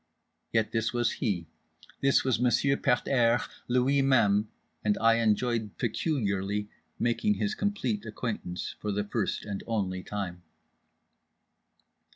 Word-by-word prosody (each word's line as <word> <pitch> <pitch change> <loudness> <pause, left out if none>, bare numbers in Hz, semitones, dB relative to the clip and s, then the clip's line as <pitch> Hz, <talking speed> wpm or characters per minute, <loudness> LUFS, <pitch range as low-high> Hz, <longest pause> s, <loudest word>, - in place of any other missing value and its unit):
Yet 110 -1 +1
this 115 +1 0
was 120 -2 +1
he, 95 -9 -1 0.6
this 140 0 +4
was 130 -4 +1
Monsieur 125 +3 +3
Pet 125 -3 +1
airs 120 -3 +3 0.2
Lui 125 +3 +3
Même; 110 -6 +3 0.4
and 105 -1 +2
I 115 0 +4
enjoyed 115 -1 0
peculiarly 105 - -1 0.3
making 120 - +1
his 210 +1 -1
complete 165 - -1
acquaintance 105 -5 -4
for 105 - -2
the 105 +1 0
first 100 - -2
and 100 -2 -5
only 95 -5 -1
time. 90 -3 -5
115 Hz, 125 wpm, -29 LUFS, 105-125 Hz, 0.6 s, this